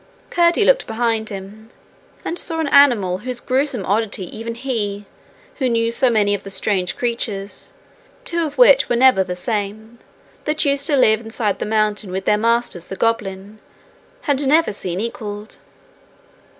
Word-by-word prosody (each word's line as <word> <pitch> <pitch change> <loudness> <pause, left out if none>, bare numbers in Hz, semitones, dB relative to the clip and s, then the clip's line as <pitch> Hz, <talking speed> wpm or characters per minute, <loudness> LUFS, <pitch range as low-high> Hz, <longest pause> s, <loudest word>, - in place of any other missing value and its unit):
Curdie 345 +4 +3
looked - - +3
behind 225 -1 -1
him, 205 +3 -9 0.6
and 345 - -2
saw 325 -2 -1
an 320 - 0
animal 230 -11 +4
whose 250 +2 -3
gruesome 255 -6 -1
oddity 205 -1 -1
even 230 +1 -5
he, 215 -5 -3 0.5
who 260 -2 +1
knew 230 0 +1
so 250 +2 +2
many 210 -3 +2
of 205 - -2
the 195 - -9
strange 190 -2 -1
creatures, 220 -5 -2 0.5
two 340 -1 -1
of 300 -3 -5
which - - +6
were 240 - +2
never 255 -5 +5
the 180 -1 -5
same, 220 +3 -4 0.5
that 305 0 0
used 280 0 +1
to 290 - +2
live 220 -4 +4
inside 225 -3 -2
the - - -3
mountain 215 -2 0
with 190 +1 -4
their - - +3
masters 230 -6 0
the 195 - -7
goblins, 205 -1 -2 0.6
had 285 -2 0
never 315 -2 +3
seen 180 -2 -4
equalled. 215 -2 -6
225 Hz, 160 wpm, -19 LUFS, 205-260 Hz, 0.6 s, which